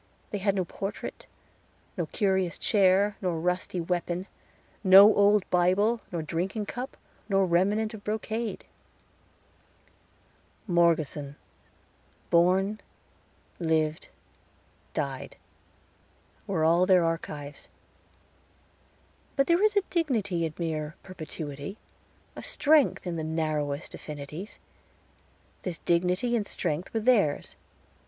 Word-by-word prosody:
They 205 - -2
had 200 0 +1
no 185 -2 0
portrait, 195 +4 -6 0.7
nor - - -2
curious 190 -4 0
chair, 200 0 +3
nor 175 -4 -1
rusty 180 +1 -1
weapon 175 +1 -2 0.6
no 200 +2 +9
old 205 -1 +4
Bible, 195 +6 +3
nor 170 -3 -3
drinking 185 +7 -2
cup, 250 +5 -6 0.3
nor 195 -1 +3
remnant 200 +6 +1
of 210 -2 -9
brocade. 220 +1 -3 2.0
Morgeson 160 -6 +1 1.0
Born 190 +5 +3 0.8
Lived 160 -1 0 0.9
Died - - -3 1.1
were 185 -6 0
all 170 +3 +4
their 185 -2 +5
archives. 150 -3 -5 1.7
But 275 - +3
there 340 +4 +3
is 425 -1 +3
a 405 - +3
dignity 220 - 0
in 155 - -10
mere 160 -2 -3
perpetuity, 155 -1 -7 0.6
a - - -7
strength 295 -6 +2
in 175 -2 -3
the 160 - -3
narrowest 155 -2 -2
affinities. 150 +6 -8 1.0
This 180 -3 -4
dignity 180 +7 +1
and 210 -4 -1
strength 170 0 -3
were 225 - -1
theirs. 215 - +2
185 Hz, 105 wpm, -28 LUFS, 165-210 Hz, 2.0 s, no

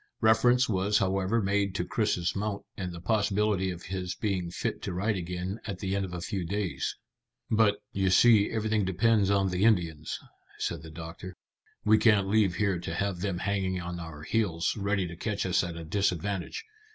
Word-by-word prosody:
Reference 120 +3 +4
was 100 0 +2
however 95 +3 +1
made 100 0 +1
to 90 - -1
Chris's 90 -5 0
mount 100 0 -3
and 90 -2 -4
the 85 - -7
possibility 105 -1 +1
of 90 -1 -6
his 90 0 -4
being 95 -5 -1
fit - - -3
to - - -4
ride 100 +4 0
again 90 +3 -4
at 100 -3 -4
the 95 +1 -2
end 100 -1 0
of 90 - -8
a 90 -1 -5
few 95 0 -3
days. 90 -6 -2 0.6
"But, 110 -2 +4 0.2
you 95 -3 +1
see, 105 +1 +6
everything 110 -1 0
depends 100 +2 +2
on 100 -1 +2
the 90 +1 0
Indians," 85 -9 +1 0.4
said 85 - -2
the 80 - -10
doctor. 80 +3 -8 0.5
"We 110 0 +5
can't 105 -4 +4
leave 100 -3 +3
here 100 -4 +1
to 85 -1 -5
have 100 -1 -1
them 95 -1 -2
hanging 95 -1 -1
on 85 0 -5
our 80 -2 -8
heels, 90 -3 0
ready 100 -2 0
to 85 -1 -7
catch 100 +3 -2
us 95 0 +2
at 85 -1 -5
a 85 - -6
disadvantage. 95 - -1
95 Hz, 190 wpm, -29 LUFS, 90-105 Hz, 0.6 s, see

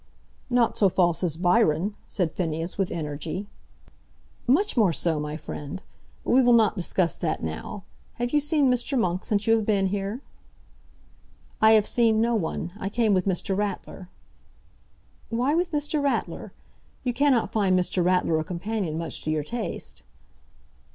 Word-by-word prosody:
"Not 245 -2 +2
so 200 - +5
false 175 -1 +1
as 165 -3 -1
Byron," 180 0 +2
said 175 -5 -1
Phineas 165 0 -3
with 195 -2 -1
energy. 155 +4 -4 1.0
"Much 355 +12 +2
more 210 -8 +3
so, 160 0 +1
my 150 +1 -4
friend. 145 +1 -7 0.4
But - - -1
we 260 - +6
will 245 -1 +5
not 220 -3 +4
discuss 180 -2 +1
that 155 - -2
now. 80 - -5 0.3
Have 240 0 -2
you 300 - +5
seen 295 0 +1
Mr. 250 +3 -1
Monk 180 -5 0
since 205 -1 0
you 225 0 +5
have 220 - -2
been 200 -3 +2
here?" 200 +5 -3 1.4
"I 220 0 +7
have 215 -2 +5
seen 225 -2 +2
no 235 +1 +2
one. 175 -4 -2
I 195 - -3
came 220 -1 +2
with 185 0 +1
Mr. 190 +1 0
Ratler." 195 -2 -4 1.2
"Why 245 +5 +1
with 350 +2 0
Mr. 295 0 -1
Ratler? 280 - -2 0.5
You 245 - -1
cannot 260 -2 +2
find 195 -4 +2
Mr. 180 0 0
Ratler 180 -3 +2
a - - -1
companion 180 -1 -3
much 165 -1 -3
to - - -4
your 155 -1 0
taste." 220 - -5
200 Hz, 160 wpm, -25 LUFS, 170-235 Hz, 1.4 s, I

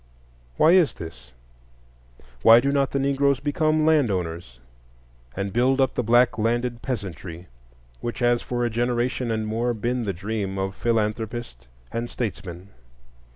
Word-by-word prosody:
Why 160 - +6
is 175 -5 +4
this? 65 -7 -10 1.1
Why 115 +1 +8
do 140 +3 0
not 140 -1 +1
the - - -2
Negroes 140 0 +2
become 155 +1 +1
land 155 -6 +4
owners, 85 -9 -4 0.8
and 100 0 -3
build 130 +3 +2
up 135 -1 +2
the - - 0
black 120 0 +3
landed 120 +2 0
peasantry, 90 - -5 0.5
which 120 - -4
has 120 -1 +2
for 120 -1 -2
a - - 0
generation 120 +1 -1
and 110 -1 -1
more 115 +2 -1
been 120 +2 -2
the 100 - 0
dream 100 +1 -4
of 95 0 -2
philanthropist 110 - -2 0.2
and 120 +1 -3
statesman? 95 -5 -5
120 Hz, 145 wpm, -24 LUFS, 100-125 Hz, 1.1 s, Why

